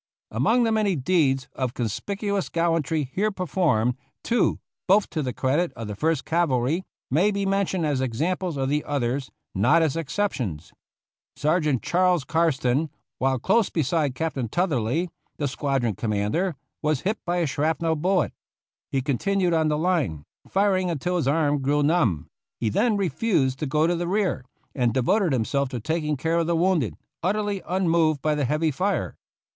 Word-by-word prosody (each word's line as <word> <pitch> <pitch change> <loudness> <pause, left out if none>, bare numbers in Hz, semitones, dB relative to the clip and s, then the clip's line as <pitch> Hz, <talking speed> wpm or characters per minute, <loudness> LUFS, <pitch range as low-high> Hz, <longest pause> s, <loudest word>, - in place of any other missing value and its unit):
Among 220 - +2
the 225 - +2
many 210 -4 +2
deeds 135 -3 +1
of 130 -2 -3
conspicuous 200 - -2
gallan 165 -1 +1
try 150 0 -1
here 210 +3 +1
performed, 155 - +1 0.3
two, 235 -2 +1 0.3
both 200 +2 +4
to 155 - -1
the 130 -3 -2
credit 145 +8 0
of 115 - -7
the 105 - -5
First 155 +4 0
Cavalry, 160 0 +1 0.3
may 170 +10 +4
be 200 -1 -1
mentioned 195 -3 0
as 145 -3 0
examples 160 +7 -1
of 135 -1 0
the 150 +2 0
others, 135 -1 -2 0.2
not 125 - +4
as 155 -3 0
exceptions. 135 - -3 0.6
Sergeant 150 -4 +1
Charles 180 -3 +2
Karsten, 155 -2 +1 0.3
while 130 0 +2
close 220 - +2
beside 150 -3 0
Captain 140 -7 -2
Tutherly, 165 - 0 0.3
the 145 - -1
squadron 135 -4 -1
commander, 110 - -1 0.3
was 155 -3 0
hit 210 +3 -2
by 175 0 -1
a 175 - +2
shrapnel 160 +3 0
bullet. 180 +4 +1 0.6
He 135 -1 0
continued 180 +7 +1
on 160 -1 +2
the 150 -1 +1
line, 150 - 0 0.2
firing 190 -2 +2
until 175 +3 -1
his 160 - 0
arm 145 -1 +2
grew 145 +2 +2
numb; 140 - +2
and - - -25 0.3
he 115 - 0
then 215 - +2
refused 165 - 0
to 155 - -2
go 150 +4 +2
to 175 +1 +2
the 170 0 -2
rear, 190 -7 0 0.3
and 120 -4 0
devoted 170 - +2
himself 135 +2 0
to 125 - -4
taking 150 +3 -1
care 165 +5 0
of 165 - 0
the 170 - +1
wounded, 165 - +1 0.3
utterly 205 +1 -1
unmoved 165 -5 +2
by 155 - +2
the 150 -2 0
heavy 155 +4 +1
fire. 190 +8 -1
155 Hz, 165 wpm, -25 LUFS, 130-180 Hz, 0.6 s, both